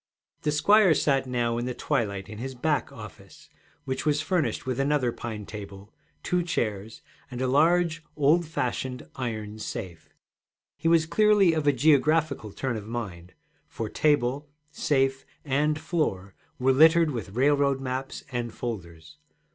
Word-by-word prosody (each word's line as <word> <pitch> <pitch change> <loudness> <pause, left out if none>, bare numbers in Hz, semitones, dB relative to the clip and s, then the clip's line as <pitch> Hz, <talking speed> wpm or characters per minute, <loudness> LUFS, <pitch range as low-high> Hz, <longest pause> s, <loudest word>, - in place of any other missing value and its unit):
The 150 - 0
squire 185 +4 +5
sat 135 -2 +1
now 120 -2 0
in 120 - -3
the 125 -1 -3
twilight 100 -4 -2
in 105 -1 -9
his 130 +2 -5
'back' 145 +3 -1
office, - - -13 0.3
which 130 -1 -3
was 150 -1 +1
furnished 170 +1 -1
with 130 0 -2
another 135 -3 +1
pine 115 -3 -6
table, 100 0 -10 0.3
two 180 0 +1
chairs, 110 - -3 0.3
and 125 -2 -7
a 130 - 0
large 160 +3 +2
old 155 +3 +3
fashioned 125 -3 -3
iron 110 -4 -5
safe. 85 -6 -7 0.7
He - - -3
was 165 -1 +4
clearly 200 +1 +4
of 155 -2 -1
a - - +7
geographical 145 -3 +2
turn 130 +2 -3
of 105 -1 -8
mind, 95 -7 -6 0.3
for 110 -2 -5
table, 145 -1 +1 0.2
safe, 135 -3 0 0.2
and 150 +2 +1
floor 155 - -2 0.2
were 130 +1 +3
littered 160 +3 +5
with 110 -6 -6
railroad 140 +1 +2
maps 130 0 -4
and 120 -2 -3
folders. 85 -11 -7
135 Hz, 145 wpm, -26 LUFS, 115-155 Hz, 0.7 s, a